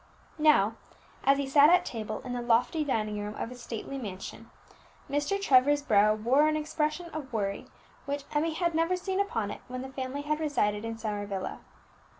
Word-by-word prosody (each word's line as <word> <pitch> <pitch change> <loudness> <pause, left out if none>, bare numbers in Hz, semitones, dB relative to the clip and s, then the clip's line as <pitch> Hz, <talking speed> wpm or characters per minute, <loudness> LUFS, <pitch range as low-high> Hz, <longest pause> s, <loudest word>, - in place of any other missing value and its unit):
Now 230 -8 +4 0.5
as 275 0 +4
he 280 - -1
sat 285 +2 +7
at 360 +1 +5
table 215 -2 -5
in 245 - -4
the 245 - -2
lofty 240 +7 +2
dining 215 -7 -1
room 210 +1 -5
of - - -4
his 250 -1 -10
stately 235 +4 -5
mansion, 195 -6 -7 0.6
Mr. 290 +8 0
Trevor's 285 -4 +4
brow 215 -4 +4
wore 255 +8 +3
an 310 - +1
expression 310 +2 -2
of 290 -4 -6
worry 200 -3 -2 0.4
which 285 0 -2
Emmie 315 +2 0
had 340 0 0
never 330 +3 +2
seen 375 +1 -2
upon 225 - -1
it - - -8
when 255 0 -5
the 265 0 -9
family 265 +2 -4
had 305 +1 -1
resided 210 -9 0
in 225 0 -4
Summer 210 -2 -3
Villa. 195 -2 -4
265 Hz, 185 wpm, -29 LUFS, 220-305 Hz, 0.6 s, sat